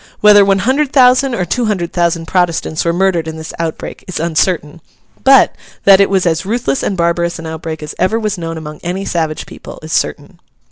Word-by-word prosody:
Whether 210 Hz, -1 st, +7 dB
one 195 Hz, 0 st, +2 dB
hundred 265 Hz, +7 st, 0 dB
thousand 255 Hz, -1 st, +4 dB
or 180 Hz, -, -1 dB
two 240 Hz, +8 st, -1 dB
hundred 185 Hz, -6 st, -2 dB
thousand 170 Hz, -1 st, 0 dB
Protestants 170 Hz, -2 st, 0 dB
were 170 Hz, -, +1 dB
murdered 175 Hz, -2 st, 0 dB
in 160 Hz, 0 st, -6 dB
this 160 Hz, 0 st, -8 dB
outbreak, 165 Hz, -1 st, -5 dB
is 185 Hz, -, -4 dB
uncertain; 165 Hz, -1 st, -1 dB, 0.4 s
but, 270 Hz, -1 st, +5 dB, 0.3 s
that 195 Hz, 0 st, +6 dB
it 200 Hz, -, +3 dB
was 190 Hz, -2 st, +1 dB
as 160 Hz, -1 st, 0 dB
ruthless 195 Hz, -, -1 dB
and 195 Hz, -, -2 dB
barbarous 170 Hz, 0 st, 0 dB
an 165 Hz, -, -9 dB
outbreak 160 Hz, -1 st, -6 dB
as 150 Hz, -, -6 dB
ever 200 Hz, +5 st, +1 dB
was 215 Hz, -2 st, -2 dB
known 165 Hz, -2 st, -5 dB
among 150 Hz, -1 st, -8 dB
any 185 Hz, +3 st, -4 dB
savage 160 Hz, -4 st, -2 dB
people, -, -, -11 dB
is -, -, -6 dB
certain. -, -, -2 dB
175 Hz, 200 wpm, -15 LUFS, 165-200 Hz, 0.4 s, Whether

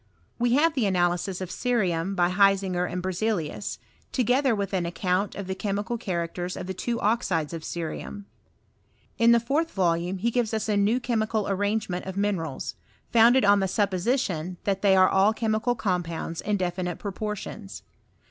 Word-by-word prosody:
We 240 Hz, 0 st, +2 dB
have 310 Hz, +4 st, +4 dB
the 245 Hz, -8 st, +1 dB
analysis 180 Hz, 0 st, 0 dB
of 185 Hz, -1 st, -5 dB
cerium 195 Hz, -7 st, 0 dB
by 175 Hz, -1 st, +2 dB
Hisinger 190 Hz, -2 st, +2 dB
and 180 Hz, 0 st, -3 dB
Berzelius, 190 Hz, -1 st, -2 dB, 0.3 s
together 255 Hz, 0 st, +2 dB
with 200 Hz, -1 st, -3 dB
an 180 Hz, -3 st, 0 dB
account 180 Hz, +3 st, -1 dB
of 200 Hz, -, -5 dB
the 190 Hz, -, -3 dB
chemical 205 Hz, +3 st, -2 dB
characters 175 Hz, -3 st, -3 dB
of -, -, -5 dB
the 190 Hz, -, -4 dB
two 235 Hz, +5 st, -2 dB
oxides 185 Hz, -8 st, 0 dB
of 165 Hz, -, -5 dB
cerimn. 170 Hz, +5 st, -5 dB, 1.0 s
In 230 Hz, 0 st, +6 dB
the 235 Hz, -, +6 dB
fourth 285 Hz, +8 st, 0 dB
volume 175 Hz, -, 0 dB
be 230 Hz, +6 st, 0 dB
gives 230 Hz, -2 st, 0 dB
us 220 Hz, -, -2 dB
a 210 Hz, -, +1 dB
new 205 Hz, +5 st, +2 dB
chemical 220 Hz, -3 st, 0 dB
ar 195 Hz, -, 0 dB
rajigement 205 Hz, -2 st, -1 dB
of 190 Hz, 0 st, -5 dB
minerals, 190 Hz, -8 st, -2 dB, 0.4 s
founded 235 Hz, +2 st, +6 dB
on 200 Hz, 0 st, +5 dB
the 190 Hz, -, +1 dB
suppositioa 185 Hz, -, 0 dB
that 195 Hz, -1 st, -1 dB
they 195 Hz, -2 st, +5 dB
are 185 Hz, 0 st, +6 dB
all 195 Hz, +3 st, +4 dB
chemical 220 Hz, +2 st, 0 dB
compounds 170 Hz, -5 st, -2 dB
in 210 Hz, -1 st, 0 dB
definit* 180 Hz, -1 st, -2 dB
proportions. 210 Hz, 0 st, -6 dB
195 Hz, 165 wpm, -26 LUFS, 180-220 Hz, 1.0 s, In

